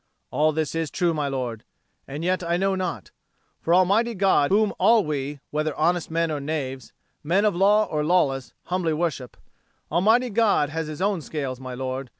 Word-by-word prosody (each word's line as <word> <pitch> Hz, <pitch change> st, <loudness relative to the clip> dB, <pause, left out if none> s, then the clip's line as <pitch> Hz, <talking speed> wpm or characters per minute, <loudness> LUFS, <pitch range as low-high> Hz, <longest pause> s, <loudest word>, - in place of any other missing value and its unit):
All 155 Hz, +1 st, +2 dB
this 155 Hz, -1 st, -2 dB
is 165 Hz, -2 st, -2 dB
true, 175 Hz, -2 st, 0 dB
my 150 Hz, -2 st, -1 dB
lord. 125 Hz, -5 st, -4 dB, 0.4 s
And 145 Hz, +4 st, -6 dB
yet 185 Hz, +1 st, 0 dB
I 170 Hz, 0 st, 0 dB
know 195 Hz, +1 st, +1 dB
not. 175 Hz, -, -4 dB, 0.5 s
For 165 Hz, -, -2 dB
Almighty 200 Hz, +6 st, +3 dB
God, 190 Hz, -7 st, +3 dB
whom 210 Hz, +1 st, +2 dB
all 225 Hz, -4 st, +4 dB
we, 145 Hz, -1 st, -3 dB
whether 155 Hz, 0 st, -1 dB
honest 170 Hz, +1 st, +1 dB
men 165 Hz, 0 st, 0 dB
or 150 Hz, -, -2 dB
knaves, 135 Hz, -4 st, -4 dB, 0.3 s
men 185 Hz, +7 st, +2 dB
of 205 Hz, -4 st, +2 dB
law 205 Hz, +4 st, +4 dB
or 150 Hz, -1 st, -2 dB
lawless, 145 Hz, -6 st, +1 dB
humbly 180 Hz, -3 st, -1 dB
worship 155 Hz, -6 st, -3 dB, 0.5 s
Almighty 220 Hz, +9 st, +3 dB
God 205 Hz, -9 st, +2 dB
has 160 Hz, +1 st, -3 dB
His 155 Hz, +4 st, -4 dB
own 200 Hz, -4 st, 0 dB
scales, 140 Hz, -4 st, -4 dB
my 130 Hz, -1 st, -7 dB
lord. 130 Hz, 0 st, -4 dB
160 Hz, 180 wpm, -24 LUFS, 145-185 Hz, 0.5 s, all